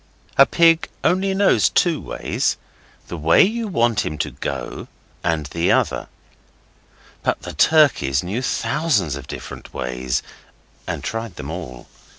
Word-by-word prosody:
A 135 - +7
pig 165 -1 +4
only 190 +2 +2
knows 200 0 +4
two 170 -4 +2
ways - - -2 0.5
the 85 - -6
way 80 +1 +5
you 225 +3 -1
want 120 - +1
him 75 - -4
to 75 - -2
go, - - -5 0.4
and 80 -3 0
the 85 +4 0
other. - - +1 1.1
But - - -1
the - - -6
turkeys 140 - +3
knew 100 +8 -3
thousands 130 - 0
of 70 -1 -9
different - - -9
ways, 60 0 -2 0.6
and - - -4
tried 115 -3 -4
them 75 +1 -6
all. 65 -9 -7
100 Hz, 140 wpm, -21 LUFS, -, 1.1 s, A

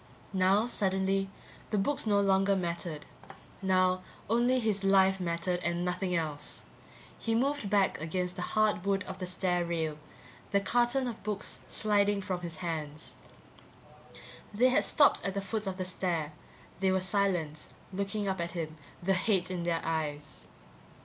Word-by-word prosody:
Now, 190 +3 +4
suddenly, 195 -3 0 0.4
the 215 - 0
books 270 +5 0
no 205 -1 +4
longer 195 0 +3
mattered. 170 -4 -3 0.6
Now 185 -1 +3 0.3
only 245 +2 +3
his 215 -4 0
life 195 0 +4
mattered 175 0 -1
and 175 0 -1
nothing 180 0 -1
else. 150 -3 -3 0.6
He 225 0 0
moved 270 -2 0
back 200 -5 +2
against 180 +3 -2
the 180 - -5
hard 215 -1 +1
wood 200 0 +1
of - - -8
the 185 - -3
stair 180 -1 0
rail, 160 -3 -2 0.5
the 200 - +3
carton 240 +5 +2
of 235 -3 -5
books 210 -1 -2
sliding 205 -1 +2
from 185 -2 -3
his 170 -2 -5
hands. 155 -2 -4 1.4
They 240 +5 +4
had 255 - +3
stopped 290 - +4
at 195 - -2
the - - +1
foot 210 +1 -3
of 190 -1 -3
the 185 - -2
stair; 170 -5 -2 0.5
they 190 0 +3
were 190 - +2
silent, 180 -5 0 0.3
looking 200 +2 -2
up 190 -2 -1
at 170 0 -3
him, 160 -2 -4 0.3
the 195 +2 +3
hate 185 -1 +1
in 180 -2 -2
their 170 -1 0
eyes. 155 -2 -3
190 Hz, 155 wpm, -31 LUFS, 175-200 Hz, 1.4 s, Now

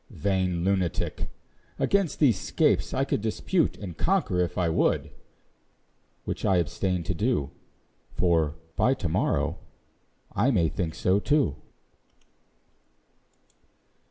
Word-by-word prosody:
Vain 95 -3 -1
lunatic! 95 -3 -1 0.5
Against 200 -5 +1
these 120 -11 +4
scapes - - +1
I - - 0
could - - -1
Dispute 150 - 0
and 90 -5 -7
conquer 170 - +1
if 90 -1 -1
I 90 -2 +2
would; 80 - +1 1.1
Which - - -4
I 95 - +3
abstain 90 +2 -1
to 90 - -1
do; 95 - 0 0.6
For, 80 -4 +2 0.2
by 130 - +3
to 95 - -3
morrow, 80 - 0 0.7
I 115 +7 +2
may 90 - +2
think 85 -3 -3
so 95 +2 +2
too. 140 - +1
95 Hz, 115 wpm, -27 LUFS, 85-115 Hz, 1.1 s, these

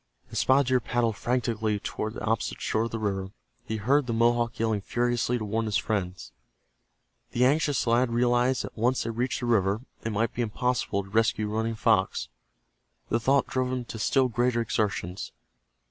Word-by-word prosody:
As - - -1
Spotted 135 +2 +4
Deer 130 -1 +4
paddled 120 -2 0
frantically 110 -3 -1
toward 110 +1 -4
the - - -5
opposite 110 0 -1
shore 110 +1 0
of - - -3
the 115 - -4
river, 95 -3 -2 0.4
he 110 - -3
heard 130 +6 +2
the 115 - -1
Mohawk 120 0 +2
yelling 110 -2 0
furiously 120 +2 0
to 110 - -4
warn 110 +2 -1
his 105 -3 +1
friends. 90 - -3 1.0
The 125 +1 +3
anxious 145 +1 +2
lad 120 +1 +3
realized 120 +1 +2
that - - -8
once 125 +3 +1
they 115 - -3
reached 125 +3 -2
the - - -2
river 105 -2 +2 0.2
it 115 - -2
might 110 +2 0
be 120 - -2
impossible 120 -2 -1
to 95 - -14
rescue 110 -1 +1
Running 115 +1 -1
Fox. - - +1 0.8
The 115 - +2
thought 135 +4 +3
drove 130 -1 -1
him 125 -1 -3
to 115 - -7
still 130 +4 +3
greater 120 0 +1
exertions. 100 -5 -2
115 Hz, 180 wpm, -27 LUFS, 110-125 Hz, 1.0 s, Spotted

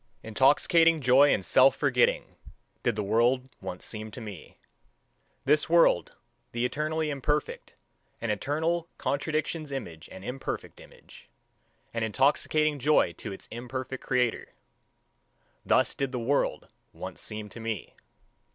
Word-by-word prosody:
Intoxicating 155 +8 +4
joy 135 +2 +5
and 95 - 0
self 130 +8 +5
forgetting, 130 -4 +1 0.5
did 120 - 0
the 105 - -2
world 120 +5 +2
once 90 - -6
seem 110 -1 -5
to 110 - -9
me. 105 -6 -10 0.9
This 150 +3 +3
world, 170 - +4 0.4
the 120 +1 0
eternally 155 +4 -1
imperfect, 145 +2 -2 0.4
an 115 - -2
eternal 160 +9 -1
contradiction's 155 +1 -2
image 85 - -6
and 95 +1 -10
imperfect 135 +2 -5
image - - -16 0.6
an 115 - -2
intoxicating 145 +6 +2
joy 135 - +3
to - - -7
its 95 - -8
imperfect 130 +2 -6
creator: 125 -3 -1 1.1
thus - - +3
did 135 -2 -2
the 130 - -3
world 130 +4 0 0.3
once - - -8
seem 105 0 -5
to 115 - -10
me. 115 -4 -5
130 Hz, 125 wpm, -28 LUFS, 115-150 Hz, 1.1 s, joy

